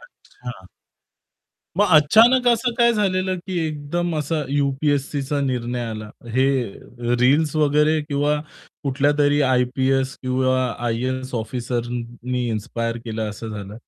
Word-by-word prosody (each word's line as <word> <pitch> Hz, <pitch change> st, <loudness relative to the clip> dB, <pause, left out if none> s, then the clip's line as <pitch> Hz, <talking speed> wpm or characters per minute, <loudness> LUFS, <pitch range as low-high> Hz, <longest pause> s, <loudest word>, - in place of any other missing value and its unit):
अच्छा. -, -, -12 dB, 1.1 s
मग 205 Hz, -, +4 dB
अचानक 230 Hz, -, +6 dB
असं 235 Hz, +1 st, +2 dB
काय 235 Hz, 0 st, +5 dB
झालेलं 185 Hz, -3 st, 0 dB
की 185 Hz, -2 st, -2 dB
एकदम 155 Hz, +3 st, -2 dB
असा 150 Hz, +2 st, -2 dB
यू-पी-एस-सीचा 140 Hz, 0 st, 0 dB
निर्णय 125 Hz, -2 st, -2 dB
आला. 110 Hz, -1 st, -6 dB, 0.2 s
हे 120 Hz, -2 st, -1 dB
रील्स 145 Hz, +4 st, +3 dB
वगैरे 150 Hz, +1 st, +3 dB
किंवा 145 Hz, +1 st, +1 dB, 0.5 s
कुठल्यातरी 145 Hz, +2 st, +2 dB
आय-पी-एस 130 Hz, +1 st, +1 dB
किंवा 130 Hz, 0 st, +1 dB, 0.2 s
आय-ए-एस 130 Hz, +2 st, -2 dB
ऑफिसरनी 120 Hz, +1 st, -3 dB
इन्स्पायर 115 Hz, +1 st, -3 dB
केलं 110 Hz, -1 st, -3 dB
असं 110 Hz, +2 st, -7 dB
झालं? 105 Hz, 0 st, -7 dB
135 Hz, 110 wpm, -22 LUFS, 120-150 Hz, 1.1 s, अचानक